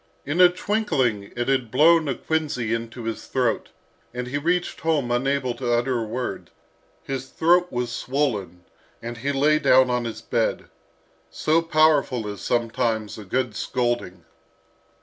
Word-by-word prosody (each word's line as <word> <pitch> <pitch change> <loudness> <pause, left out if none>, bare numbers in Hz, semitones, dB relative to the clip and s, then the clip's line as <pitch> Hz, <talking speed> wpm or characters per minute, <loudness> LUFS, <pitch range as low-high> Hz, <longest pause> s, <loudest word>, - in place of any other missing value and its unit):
In 155 +6 +1
a 180 - +9
twinkling 175 - -1
it 120 0 -2
had 130 -4 +1
blown 155 +5 +5
a 135 - -1
quinsy 145 -8 -2
into 115 +1 -5
his 115 0 -5
throat, 125 -4 0 0.5
and 125 0 -3
he 135 +3 -3
reached 175 +4 -1
home 150 -7 0
unable 130 +1 0
to 120 -1 -3
utter 120 +1 +1
a - - -2
word. 125 +3 -4 0.5
His 135 -1 -4
throat 175 +5 +2
was 125 -1 -2
swollen, 110 - -2 0.3
and 120 0 -7
he 140 +4 -1
lay 150 +2 +3
down 130 -2 +5
on 125 -1 0
his 110 -1 -6
bed. 115 -1 -1 0.6
So 155 - +1
powerful 155 -8 +2
is 100 -1 -6
sometimes 115 -2 -1
a - - -8
good 120 +2 -1
scolding! 120 -6 -2
125 Hz, 150 wpm, -24 LUFS, 115-150 Hz, 0.6 s, a